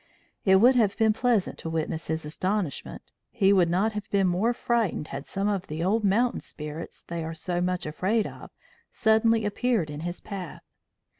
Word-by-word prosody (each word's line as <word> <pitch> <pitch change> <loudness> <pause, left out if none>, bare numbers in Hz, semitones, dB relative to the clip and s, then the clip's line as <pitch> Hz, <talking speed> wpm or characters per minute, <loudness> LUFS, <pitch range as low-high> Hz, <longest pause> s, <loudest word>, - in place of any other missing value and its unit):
It 190 -1 +6
would 240 +7 +6
have 215 -5 +2
been 220 -2 +4
pleasant 230 -3 +1
to 165 - -5
witness 160 0 -2
his 160 -1 -2
astonishment; 185 +1 -3 0.3
he 200 -4 +3
would 180 -3 +4
not 190 +6 +2
have 210 -1 -6
been 195 -1 +2
more 185 +6 +2
frightened 235 -10 -1
had 135 +1 -6
some 195 +1 -1
of 195 -2 -1
the 155 +2 -3
old 215 +5 +1
mountain 225 +5 +2
spirits 150 +2 -8
they 170 -1 -5
are 165 0 -5
so 175 +2 -2
much 180 0 -1
afraid 190 +8 0
of - - -9 0.4
suddenly 220 0 +3
appeared 205 -6 0
in 145 - -6
his 175 +2 -4
path. 190 -6 -7
190 Hz, 180 wpm, -27 LUFS, 165-220 Hz, 0.4 s, It